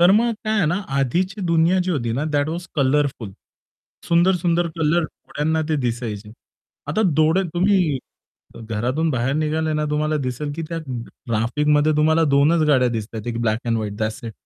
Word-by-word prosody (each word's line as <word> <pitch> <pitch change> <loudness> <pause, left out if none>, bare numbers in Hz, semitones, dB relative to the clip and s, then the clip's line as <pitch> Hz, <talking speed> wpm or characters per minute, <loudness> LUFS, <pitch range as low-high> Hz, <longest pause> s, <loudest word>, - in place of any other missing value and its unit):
तर 175 +1 +7
मग 230 +3 +3
काय 215 - 0
आहे 200 - +3
ना, 170 +4 +1 0.2
आधीची 180 - 0
दुनिया 170 +2 +3
जी 185 - -2
होती 120 -9 -1
ना, 135 +6 -1
दॅट 145 0 +1
वॉज 170 +2 -4
कलरफुल. 135 -6 0 0.8
सुंदर 175 +3 +4
सुंदर 175 0 +1
कलर 165 +1 +2
डोळ्यांना 155 +1 -3
ते 155 - +1
दिसायचे. 115 -3 -3 0.6
आता 170 +9 +1
डोळे 160 +5 +3
तुम्ही 180 -5 +2 0.6
अ, - - -9
घरातून 120 +8 -1
बाहेर 130 0 0
निघाले 155 +1 0
ना 150 0 0
तुम्हाला 155 +1 0
दिसेल 145 +4 -3
की 165 - -3
त्या 165 0 -3
ट्रॅफिकमध्ये 130 +5 0
तुम्हाला 160 +2 +3
2 145 +4 +4
च - - 0
गाड्या 130 -4 +4
दिसतायेत 110 -1 -5
एक 115 0 -3
black 110 -2 +1
end 115 -1 +1
white 105 -2 -3
that's 110 +1 -3
it. 115 - -5
150 Hz, 180 wpm, -21 LUFS, 120-165 Hz, 0.8 s, तर